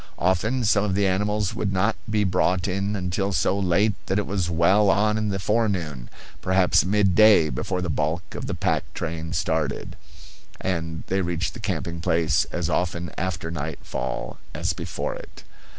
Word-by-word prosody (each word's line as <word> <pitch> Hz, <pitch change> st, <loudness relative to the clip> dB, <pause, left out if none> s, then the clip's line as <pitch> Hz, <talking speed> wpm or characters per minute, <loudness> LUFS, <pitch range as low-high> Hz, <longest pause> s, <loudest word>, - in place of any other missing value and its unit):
Often 110 Hz, +8 st, +1 dB
some 105 Hz, -1 st, +3 dB
of 100 Hz, -3 st, 0 dB
the 100 Hz, 0 st, +2 dB
animals 105 Hz, +1 st, 0 dB
would 100 Hz, -, -1 dB
not 100 Hz, +4 st, +1 dB
be 105 Hz, -1 st, +2 dB
brought 90 Hz, -1 st, +1 dB
in 100 Hz, +2 st, -1 dB
until 95 Hz, +1 st, -1 dB
so 95 Hz, +3 st, +1 dB
late 100 Hz, +3 st, +2 dB
that 95 Hz, -, 0 dB
it 105 Hz, -, +1 dB
was 95 Hz, -4 st, -1 dB
well 95 Hz, +5 st, +4 dB
on 105 Hz, +2 st, +3 dB
in 110 Hz, -1 st, 0 dB
the 95 Hz, -, -1 dB
forenoon, 95 Hz, -, -1 dB, 0.3 s
perhaps 95 Hz, -1 st, +3 dB
midday, 100 Hz, -3 st, +5 dB
before 90 Hz, +8 st, -2 dB
the -, -, -2 dB
bulk 80 Hz, +3 st, -2 dB
of -, -, -5 dB
the -, -, -2 dB
pack -, -, +1 dB
train 80 Hz, -2 st, -4 dB
started; 80 Hz, -3 st, -1 dB, 0.6 s
and 80 Hz, -3 st, -3 dB
they 95 Hz, +1 st, 0 dB
reached 85 Hz, -1 st, -2 dB
the -, -, -9 dB
camping 85 Hz, 0 st, -3 dB
place 80 Hz, -1 st, +2 dB
as -, -, -3 dB
often 85 Hz, -2 st, -1 dB
after 85 Hz, -2 st, -3 dB
night 80 Hz, -2 st, -4 dB
fall -, -, -4 dB, 0.2 s
as -, -, 0 dB
before -, -, -4 dB
it. -, -, -11 dB
95 Hz, 170 wpm, -24 LUFS, 85-100 Hz, 0.6 s, midday